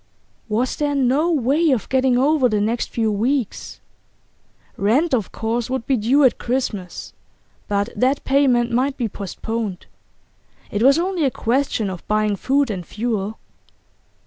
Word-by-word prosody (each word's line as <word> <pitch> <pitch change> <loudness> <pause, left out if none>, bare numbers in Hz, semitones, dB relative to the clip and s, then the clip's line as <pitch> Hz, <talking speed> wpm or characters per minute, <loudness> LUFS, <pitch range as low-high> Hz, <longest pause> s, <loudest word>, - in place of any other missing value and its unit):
Was 235 +4 0
there 290 -1 0
no 275 +5 +2
way 300 +3 +2
of 255 -6 0
getting 260 -1 +2
over 275 -1 +3
the 210 -2 +1
next 225 +3 -1
few 225 -2 0
weeks? 235 +3 -2 1.0
Rent, 260 +11 +1
of 220 -7 0
course, 230 +2 -2
would 260 -3 -2
be 270 - +2
due 250 +6 +3
at 255 - +3
Christmas, 235 -7 -3 0.5
but 205 +1 0
that 265 +3 +1
payment 255 -4 +2
might 265 +4 0
be 240 - -1
postponed; 205 0 -5 0.9
it 205 - -2
was 275 +4 +5
only 360 -1 0
a 275 - +3
question 245 -3 -1
of 185 - -9
buying 215 -1 +1
food 270 +4 +1
and 185 -3 -4
fuel. 215 +1 -3
245 Hz, 145 wpm, -21 LUFS, 215-275 Hz, 1.0 s, was